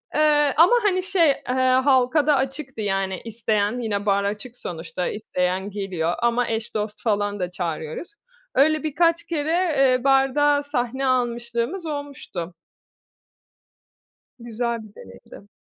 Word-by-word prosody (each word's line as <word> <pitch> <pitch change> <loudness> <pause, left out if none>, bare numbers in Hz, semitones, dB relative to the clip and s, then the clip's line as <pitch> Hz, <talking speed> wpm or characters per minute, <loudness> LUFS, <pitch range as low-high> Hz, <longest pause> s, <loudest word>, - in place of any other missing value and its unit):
Eee, 295 -2 +4
ama 335 +6 +7
hani 370 -3 +2
şey, 370 -4 +3
eee, 270 -2 -1 0.3
halka 270 +2 +3
da 300 - +5
açıktı 270 -2 -3
yani 195 -2 -1
isteyen 220 0 -1
yine 210 -4 -2
bar 200 -1 +2
açık 215 +5 -4
sonuçta, 175 0 -5
isteyen 190 -2 -2
geliyor 185 -5 -2
ama 240 +1 +1
eş 225 -1 -3
dost 210 0 -4
falan 205 -2 0
da 180 -1 -3
çağırıyoruz. 170 - -5 0.4
Öyle 310 +3 +3
birkaç 335 +2 +2
kere, 310 -2 -2 0.3
eee, 255 -2 +3
barda 275 +2 +3
sahne 265 -2 -2
almışlığımız 240 +6 -1
olmuştu. 285 - -6 1.9
Güzel 235 0 -3
bir 210 -1 -16
deneydi. 95 - -14
240 Hz, 125 wpm, -23 LUFS, 205-285 Hz, 1.9 s, ama